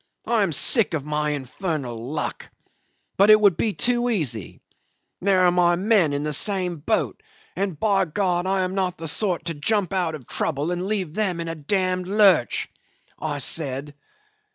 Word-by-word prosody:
I 235 -2 +1
am 195 -4 +1
sick 195 - +1
of 145 -3 -4
my 150 0 -1
infernal 140 -1 -4
luck. 130 +7 -5 0.7
But 200 +2 +5
it 215 0 +8
would 200 -4 +4
be 215 +5 0
too 245 +2 0
easy. 130 - -2 0.6
There 190 0 +3
are 180 - +5
my 175 -1 +3
men 190 -4 +2
in 145 0 -2
the 150 0 -1
same 180 +1 +1
boat 215 - -1 0.3
and, 190 -5 -2
by 195 -2 +2
God, 180 +1 -1
I 190 0 +1
am 185 0 -2
not 185 -2 -1
the 165 - -6
sort 180 +3 -1
to 165 - -2
jump 190 +5 0
out 175 -4 0
of 130 -6 -12
trouble 150 +3 -2
and 180 +1 -2
leave 195 -7 -2
them 190 -4 -1
in 165 - -4
a 165 - -3
d 155 -3 -13
d 185 -2 +1
lurch,' 195 - +3 0.5
I 150 -1 -3
said. 140 0 -2
180 Hz, 180 wpm, -23 LUFS, 150-200 Hz, 0.7 s, it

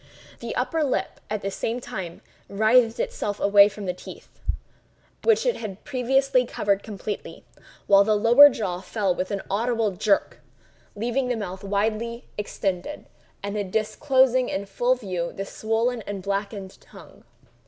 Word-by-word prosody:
The - - -5
upper 325 -2 0
lip, 225 -9 -2
at 210 -1 -3
the 195 - -2
same 230 +4 -2
time, 180 -8 -7 0.3
writhed 225 +3 +3
itself 205 -2 -2
away 200 0 +6
from 205 0 -8
the 180 - -1
teeth, 180 - -13 0.8
which 450 0 +3
it - - +1
had 205 -4 -7
previously 265 0 +2
covered 200 -4 0
completely; 210 -1 -6 0.4
while 200 0 +6
the 215 +1 +2
lower 240 +7 +8
jaw 185 -8 -3
fell 195 0 0
with 185 +1 -3
an 200 -1 -3
audible 225 +1 0
jerk, 200 +2 0 0.6
leaving 240 +5 -1
the 250 - 0
mouth 190 -3 -6
widely 220 +4 -1
extended, 200 +4 -3 0.4
and 200 -1 -3
disclosing 255 +3 +2
in 195 +1 -3
full 240 +6 +1
view 185 -8 -4
the 195 - -5
swollen 225 +3 -1
and 200 -2 -5
blackened 200 0 -4
tongue. - - -16
210 Hz, 145 wpm, -25 LUFS, 195-240 Hz, 0.8 s, lower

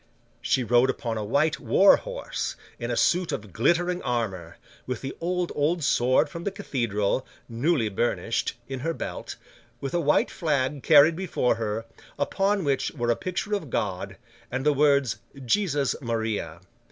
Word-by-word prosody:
She 130 - +1
rode 120 +2 +4
upon 115 -5 -2
a - - -3
white 140 +7 +1
war 195 - +6
horse, - - -4 0.2
in - - -4
a - - -1
suit 175 -1 +2
of 105 - -5
glittering 175 +8 +1
armour; 95 -9 -3 0.3
with 125 -2 -3
the 135 - -5
old, 180 +1 -1
old 155 +3 0
sword 130 -2 +3
from 170 -1 -8
the 200 - 0
cathedral, 125 - -1 0.2
newly 120 +1 +1
burnished, 115 +2 -1
in 135 -1 -5
her 165 +5 -2
belt; - - -6 0.4
with 135 +1 -5
a 175 - +2
white 150 -3 +2
flag 145 -3 -1
carried 155 +2 +6
before 175 -8 0
her, 110 0 -3 0.3
upon 195 0 +1
which 140 -2 0
were 120 -4 0
a - - +2
picture 185 - -3
of 195 -9 -2
God, 95 -5 -3 0.3
and 130 +2 -3
the 150 - +4
words 140 -3 +3 0.3
Jesus 145 - +1
Maria. 110 - -3
140 Hz, 160 wpm, -26 LUFS, 115-170 Hz, 0.4 s, war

